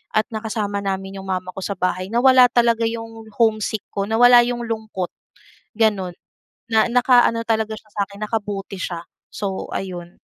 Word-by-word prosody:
at 215 Hz, -, +4 dB
nakasama 215 Hz, -2 st, -3 dB
namin 195 Hz, 0 st, -4 dB
'yong 190 Hz, -, -9 dB
mama 185 Hz, -1 st, -3 dB
ko 190 Hz, -, -8 dB
sa 200 Hz, +1 st, -3 dB
bahay, 185 Hz, 0 st, -1 dB
nawala 255 Hz, +1 st, +6 dB
talaga 235 Hz, -1 st, +3 dB
'yong 225 Hz, -1 st, -7 dB
homesick 220 Hz, -2 st, +1 dB
ko, 200 Hz, 0 st, -2 dB
nawala 245 Hz, +2 st, +7 dB
'yong 240 Hz, 0 st, -3 dB
lungkot, 220 Hz, -5 st, -4 dB, 0.7 s
gano'n. 205 Hz, -5 st, +1 dB, 0.6 s
Na 220 Hz, -1 st, +4 dB
naka-ano 245 Hz, -2 st, +4 dB
talaga 220 Hz, -1 st, -1 dB
siya 215 Hz, 0 st, -13 dB
sa 205 Hz, -, -5 dB
akin, 200 Hz, +1 st, -12 dB
nakabuti 205 Hz, -3 st, -3 dB
siya. 175 Hz, -2 st, -4 dB, 0.3 s
So, 195 Hz, -2 st, -3 dB
ayon. 175 Hz, -2 st, -6 dB
215 Hz, 155 wpm, -21 LUFS, 195-230 Hz, 0.7 s, nawala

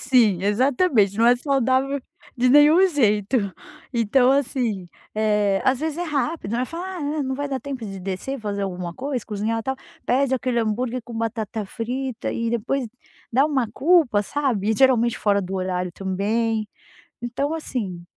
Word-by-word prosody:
Sim, 230 Hz, -8 st, +3 dB
exatamente, 225 Hz, -, +2 dB
não 230 Hz, -, +5 dB
é 245 Hz, +1 st, +6 dB
saudável 270 Hz, +1 st, +1 dB, 0.4 s
de 250 Hz, +1 st, +3 dB
nenhum 300 Hz, +7 st, +7 dB
jeito, 220 Hz, -, +2 dB, 0.6 s
então 245 Hz, +3 st, +3 dB
assim, 240 Hz, -9 st, 0 dB, 0.3 s
eh, 210 Hz, -2 st, +2 dB
às 260 Hz, -1 st, +3 dB
vezes 315 Hz, +1 st, -2 dB
é -, -, -1 dB
rápido, 300 Hz, -6 st, -2 dB
aí 250 Hz, +1 st, 0 dB
fala: 340 Hz, +2 st, -6 dB
"Ah, 380 Hz, -1 st, -6 dB
ah, 295 Hz, 0 st, -2 dB
é, -, -, 0 dB
não 265 Hz, 0 st, -2 dB
vai 285 Hz, +1 st, -3 dB
dar 265 Hz, -1 st, -3 dB
tempo 270 Hz, -5 st, -6 dB
de 195 Hz, -2 st, -6 dB
descer, 195 Hz, +9 st, -4 dB
fazer 200 Hz, -1 st, -3 dB
alguma 180 Hz, -2 st, -4 dB
coisa, 260 Hz, -1 st, -3 dB
cozinhar, 220 Hz, +2 st, -2 dB
tal." 265 Hz, +2 st, -2 dB, 0.3 s
Pede 265 Hz, +1 st, +2 dB
aquele 250 Hz, -1 st, -1 dB
hambúrguer 235 Hz, +3 st, -1 dB
com 235 Hz, -, -10 dB
batata 225 Hz, -1 st, -3 dB
frita 245 Hz, +4 st, -4 dB
e 230 Hz, 0 st, -2 dB
depois 240 Hz, +3 st, -1 dB, 0.5 s
dá 270 Hz, +5 st, +4 dB
uma 265 Hz, -6 st, 0 dB
culpa, 295 Hz, -, +3 dB
sabe. 235 Hz, -5 st, -1 dB
E 220 Hz, -, +1 dB
geralmente 240 Hz, -3 st, +3 dB
fora 200 Hz, -1 st, +2 dB
do 190 Hz, +1 st, -5 dB
horário 180 Hz, -1 st, -2 dB
também, 215 Hz, +4 st, -1 dB, 0.5 s
então 275 Hz, +6 st, -2 dB
assim 205 Hz, -, -4 dB
240 Hz, 170 wpm, -23 LUFS, 210-270 Hz, 0.6 s, nenhum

